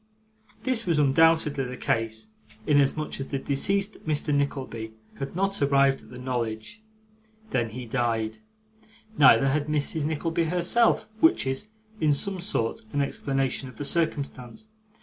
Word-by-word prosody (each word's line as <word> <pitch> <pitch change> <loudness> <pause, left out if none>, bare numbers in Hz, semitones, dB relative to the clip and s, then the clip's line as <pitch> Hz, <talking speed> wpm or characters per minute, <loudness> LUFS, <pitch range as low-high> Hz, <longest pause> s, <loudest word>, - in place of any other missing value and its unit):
This 245 -5 0
was 165 -3 +2
undoubtedly 150 0 +3
the 125 0 -6
case, 115 - -2 0.4
inasmuch 145 +1 +1
as 135 - -4
the 140 - -2
deceased 195 +10 0
Mr. 150 -1 0
Nickleby 130 -6 -2 0.3
had 135 +3 -5
not 195 0 0
arrived 140 -1 +3
at - - -17
the 125 - -10
knowledge 120 - -4 0.7
when 120 -3 0
he 125 +3 -7
died. 115 -2 -1 0.8
Neither 135 -1 +6
had 145 +2 0
Mrs. 150 +1 -1
Nickleby 165 +2 -1
herself; 180 +7 +3
which 325 - +4
is, 135 +11 -3 0.3
in 150 -4 +3
some 190 +6 0
sort, 145 - -2
an 145 - +1
explanation 135 -1 -1
of 120 - -15
the 145 - -4
circumstance. 140 - -2
140 Hz, 140 wpm, -26 LUFS, 125-165 Hz, 0.8 s, Neither